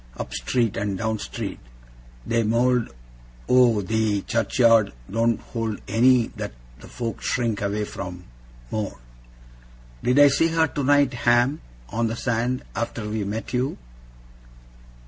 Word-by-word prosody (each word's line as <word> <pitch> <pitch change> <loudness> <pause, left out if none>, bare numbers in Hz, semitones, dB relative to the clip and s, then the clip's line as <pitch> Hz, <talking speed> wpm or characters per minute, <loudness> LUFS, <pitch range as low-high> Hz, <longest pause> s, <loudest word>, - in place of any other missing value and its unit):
Up - - -6
street 120 -4 0
and 100 -1 -2
down 110 +1 -1
street. - - -5 0.7
The 115 0 +1
mowld 120 +2 +2 0.6
o' 120 -5 +4
the 110 -1 0
churchyard 115 -2 +3 0.2
don't 115 +1 +1
hold 115 -3 -4
any 125 +1 +4
that - - -5 0.3
the - - -12
folk 115 -2 -5
shrink 115 -4 -1
away 105 +1 -1
from, 90 -3 -7 0.5
more.' 105 -2 -3 1.0
'Did 125 +2 +1
I 145 0 +9
see 145 +4 +3
her 165 0 +2
tonight, 145 -2 +2
Ham, 120 +4 +2 0.3
on 115 +1 0
the 115 - -3
sand, 125 +1 -1
after 115 -2 -3
we 105 0 -2
met 110 +5 -5
you? 125 +3 0
115 Hz, 130 wpm, -24 LUFS, 110-125 Hz, 1.0 s, I